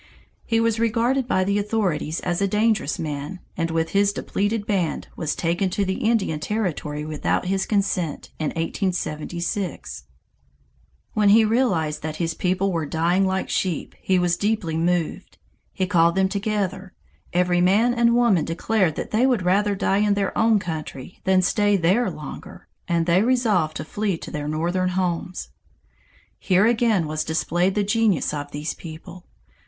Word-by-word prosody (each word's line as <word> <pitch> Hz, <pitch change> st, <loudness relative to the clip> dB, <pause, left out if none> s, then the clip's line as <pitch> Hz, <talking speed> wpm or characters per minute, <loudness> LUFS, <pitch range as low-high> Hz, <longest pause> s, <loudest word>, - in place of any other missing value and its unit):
He 225 Hz, -1 st, +2 dB
was 230 Hz, -1 st, +1 dB
regarded 235 Hz, +3 st, +1 dB
by 185 Hz, -6 st, +2 dB
the 200 Hz, +2 st, +1 dB
authorities 195 Hz, -7 st, -1 dB
as 175 Hz, +1 st, -1 dB
a 200 Hz, -, +3 dB
dangerous 210 Hz, -5 st, +1 dB
man, 150 Hz, +4 st, -5 dB, 0.2 s
and 165 Hz, -1 st, -1 dB
with 165 Hz, 0 st, 0 dB
his 200 Hz, 0 st, +3 dB
depleted 205 Hz, +1 st, -2 dB
band 185 Hz, -7 st, -1 dB
was 155 Hz, -3 st, -2 dB
taken 175 Hz, +3 st, 0 dB
to 200 Hz, +2 st, -1 dB
the 190 Hz, 0 st, -2 dB
Indian 195 Hz, -9 st, 0 dB
Territory 155 Hz, -6 st, -3 dB
without 155 Hz, +3 st, -1 dB
his 190 Hz, +1 st, 0 dB
consent 195 Hz, -6 st, -1 dB
in 155 Hz, -, -1 dB
1876. 175 Hz, +1 st, -3 dB, 1.1 s
When 210 Hz, -3 st, +3 dB
he 220 Hz, +2 st, +6 dB
realized 185 Hz, -, +1 dB
that 155 Hz, 0 st, -4 dB
his 165 Hz, 0 st, -1 dB
people 185 Hz, +3 st, 0 dB
were 165 Hz, -4 st, -2 dB
dying 175 Hz, +5 st, +1 dB
like 190 Hz, 0 st, -1 dB
sheep, 180 Hz, -5 st, -1 dB
he 190 Hz, -, +2 dB
was 175 Hz, -1 st, +1 dB
deeply 205 Hz, -6 st, -1 dB
moved. 170 Hz, 0 st, -1 dB, 0.3 s
He 190 Hz, -, -1 dB
called 170 Hz, -1 st, +3 dB
them 190 Hz, 0 st, +2 dB
together. 195 Hz, -2 st, -2 dB, 0.4 s
Every 175 Hz, 0 st, +2 dB
man 210 Hz, +7 st, +4 dB
and 235 Hz, -1 st, +3 dB
woman 235 Hz, -9 st, +3 dB
declared 170 Hz, +1 st, 0 dB
that -, -, -5 dB
they 235 Hz, +5 st, +3 dB
would 245 Hz, -8 st, +1 dB
rather 200 Hz, +3 st, +2 dB
die 195 Hz, +1 st, +1 dB
in 210 Hz, -1 st, +2 dB
their 200 Hz, -1 st, -1 dB
own 225 Hz, -1 st, +4 dB
country 160 Hz, -5 st, -6 dB
than 190 Hz, -1 st, +3 dB
stay 205 Hz, +2 st, +2 dB
there 190 Hz, +8 st, +2 dB
longer, -, -, -9 dB, 0.2 s
and 170 Hz, -1 st, +1 dB
they 175 Hz, +2 st, +3 dB
resolved 215 Hz, -10 st, +1 dB
to -, -, -5 dB
flee 200 Hz, +1 st, -2 dB
to -, -, -9 dB
their 150 Hz, -1 st, -4 dB
northern 175 Hz, +4 st, 0 dB
homes. 180 Hz, -1 st, -2 dB, 0.9 s
Here 190 Hz, +2 st, +3 dB
again 225 Hz, -6 st, +2 dB
was 155 Hz, 0 st, -2 dB
displayed 175 Hz, +3 st, 0 dB
the 210 Hz, -, +2 dB
genius 210 Hz, -6 st, +1 dB
of 145 Hz, -1 st, -4 dB
these 150 Hz, +2 st, -4 dB
people. 170 Hz, +2 st, -11 dB
185 Hz, 160 wpm, -23 LUFS, 165-210 Hz, 1.1 s, he